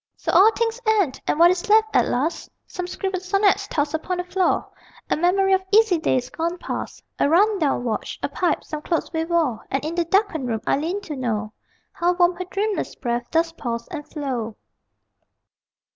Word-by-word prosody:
So - - -2
all 410 +4 +7
things 460 +1 -1
end: 400 -11 +2
and - - +1
what 340 +2 +7
is 365 +4 -3
left 435 +1 +4
at - - +4
last? 285 +7 -2 0.2
Some 360 -1 -6
scribbled 375 0 -3
sonnets 395 +1 +2
tossed 290 -5 -1
upon 355 +3 -2
the 360 - -2
floor, 365 +1 0 0.4
A - - +4
memory 385 +4 +2
of 380 - +3
easy 420 -5 +5
days 255 -5 0
gone 335 +2 -2
past, - - -6 0.2
A - - +3
run 400 +5 +4
down 285 -6 +1
watch, 230 -3 -3
a - - +2
pipe, 360 - -1
some 305 -1 -6
clothes 335 +2 -2
we 320 0 -1
wore 325 -10 0
And 270 +2 -2
in 315 - -3
the 345 0 0
darkened 335 - +1
room 225 -2 -2
I - - +2
lean 345 +8 -2
to 320 -7 -6
know 215 -5 -2 0.4
How 350 +1 +1
warm 355 0 +3
her 365 - -4
dreamless 400 +3 -2
breath 240 -1 -3
does 330 0 +1
pause 235 -7 -5
and 310 -5 -6
flow. 250 -7 -3
345 Hz, 195 wpm, -23 LUFS, 290-385 Hz, 0.4 s, all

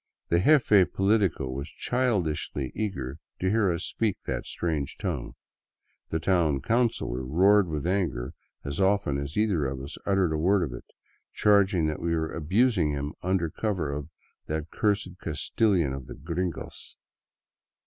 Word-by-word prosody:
The 85 - +3
jefe 105 - +5
politico 95 -8 +2
was 70 +4 -5
childishly 90 - -1
eager 80 -10 -4 0.2
to 95 +1 +1
hear 105 -4 +3
us 85 - -2
speak 110 -4 -1
that - - -3
strange 80 -5 -2
tongue; - - -4 0.7
the 80 - 0
town 80 -5 +2
councilor 110 - 0
roared 95 +8 +4
with 75 -2 -3
anger 85 -10 -1 0.3
as 70 0 -4
often 95 -7 +2
as 70 +4 -5
either 100 -9 +2
of 65 0 -4
us 70 +2 -8
uttered 95 -5 +2
a 75 - -1
word 95 +3 +3
of 65 - -4
it, - - -9 0.5
charging 100 -5 +4
that 75 -1 -2
we 85 0 0
were 80 -1 -2
abusing 95 +1 +2
him 70 0 -3
under 90 -3 0
cover 95 -9 -2
of 70 0 -5 0.2
" - - -46
that 80 +1 -3
cursed 100 -4 0
Castilian 85 0 +1
of 65 -1 -7
the - - -8
gringos." 85 -1 -5
85 Hz, 155 wpm, -27 LUFS, 75-100 Hz, 0.7 s, jefe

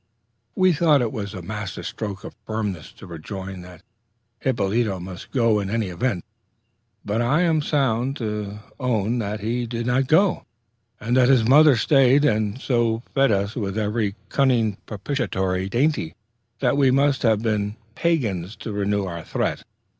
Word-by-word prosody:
We 185 -3 +4
thought 150 -4 +3
it 115 - -2 0.2
a 95 - -6
masterstroke 100 0 -5
of - - -8
firmness 105 -7 -3
to - - -13
rejoin 95 +2 -7
that 90 -2 -13 0.6
Hippolyto 110 -4 0
must 90 0 -9
go 115 -5 +2
in 100 -1 -3
any 110 -2 -1
event; 90 +1 -2 0.8
but 105 +3 0
I 140 +8 +2
am 165 -3 +2
bound 135 -3 0
to 105 -3 -4 0.2
own 120 -2 0
that 105 -1 -3
he 120 +3 -2
did 115 0 -4
not 125 +2 +1
go, 185 +6 +3 0.6
and 120 +3 -1
that 125 0 +5
his 120 -5 +4
mother 145 +2 +7
stayed, 135 +3 +4
and 110 -3 0
so 120 -3 0
fed 135 -3 +3
us 100 +1 0
with 100 -3 -3
every 105 -1 -1
cunning 120 -7 +2
propitiatory 95 -5 -2
dainty, 120 - 0 0.5
that 135 +1 +2
we 135 -2 +4
must 140 +1 +2
have 110 -2 +2
been 105 -2 -1 0.2
Pagans 110 - -1
to 110 - -7
renew 100 0 0
our 85 -3 -6
threat. - - -2
110 Hz, 155 wpm, -23 LUFS, 100-130 Hz, 0.8 s, mother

